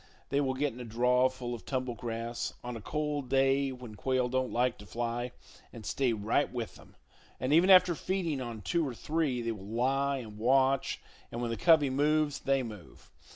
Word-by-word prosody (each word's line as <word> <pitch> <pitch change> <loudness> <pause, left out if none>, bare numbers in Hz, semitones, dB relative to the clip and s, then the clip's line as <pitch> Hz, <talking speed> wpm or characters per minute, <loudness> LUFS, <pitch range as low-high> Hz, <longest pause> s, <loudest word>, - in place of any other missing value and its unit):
They 140 +1 +2
will 130 -2 0
get 140 -1 0
in 120 - -11
a - - -5
draw 125 +3 +3
full 125 -2 -6
of 120 - -7
tumble 130 -2 -2
grass, 115 +1 -4
on 120 0 -5
a 115 - -7
cold 150 0 -2
day 135 +1 +3
when 125 -3 -9
quail 130 +3 0
don't 130 0 0
like 125 0 +1
to 105 - -11
fly, 120 +4 -3 0.4
and 115 -3 -10
stay 130 -3 +1
right 110 +5 0
with 120 -3 -4
them; - - -17 0.4
and 130 +3 0
even 170 +4 +5
after 180 -2 +8
feeding 170 -5 -2
on 115 -4 -6
two 170 - +1
or 125 - -5
three, 150 -4 -1
they 115 - -1
will 105 -4 -7
lie 135 +5 +1
and 110 -4 -8
watch, 130 +3 +2 0.3
and 120 - -4
when 120 -1 -2
the - - -1
covey 150 +2 +4
moves, 150 +1 +2
they 135 -1 +1
move. 105 -7 -11
130 Hz, 200 wpm, -31 LUFS, 120-140 Hz, 0.4 s, after